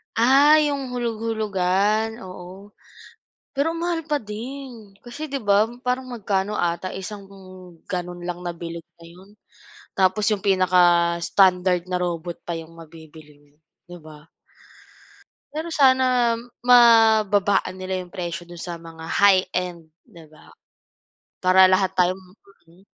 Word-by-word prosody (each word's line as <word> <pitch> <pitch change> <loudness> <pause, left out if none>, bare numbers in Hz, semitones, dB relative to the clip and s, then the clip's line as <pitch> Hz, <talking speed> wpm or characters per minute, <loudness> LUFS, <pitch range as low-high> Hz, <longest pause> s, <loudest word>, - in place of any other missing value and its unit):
Ah, 270 +6 +5
'yong 280 -3 -2
hulog-hulugan, 220 -2 -1
oo. 185 +2 -11 0.8
Pero 285 +4 0
ang 330 - -6
mahal 345 -1 -1
pa 300 -1 -1
din, 230 -1 -9
kasi 280 +6 -7
'di 275 - -2
ba, 205 +2 +3 0.2
parang 255 +1 -2
magkano 205 -3 -2
ata 175 +2 -2
isang 195 +1 -8 0.6
ganon 175 -1 -5
lang 175 0 -5
nabilog 170 -1 -7 0.2
na 170 - -14
'yon 185 +4 -17 0.7
tapos 190 +2 +2
'yong 205 -3 -1
pinaka-standard 180 0 +2
na 180 - 0
robot 175 -1 -4
pa 170 - -3
'yong 165 0 -12
mabibili 160 -2 -15
mo, 145 - -33 0.3
'di 175 0 -10
ba? 155 0 -15 1.3
Pero 315 +3 -5
sana 255 -4 +3 0.3
mababaan 220 -5 +4
nila 185 0 -3
yung 175 - -17
presyo 175 -1 -5
dun 175 -1 -12
sa 175 -1 -6
mga 165 -1 -11
high-end, 180 -4 +1 0.2
di 170 -9 -16
ba? 155 0 -19 0.9
Para 185 +1 +6
lahat 185 0 +2
tayo 180 0 +3
makabili. 185 -1 -21
190 Hz, 125 wpm, -22 LUFS, 175-225 Hz, 1.3 s, Para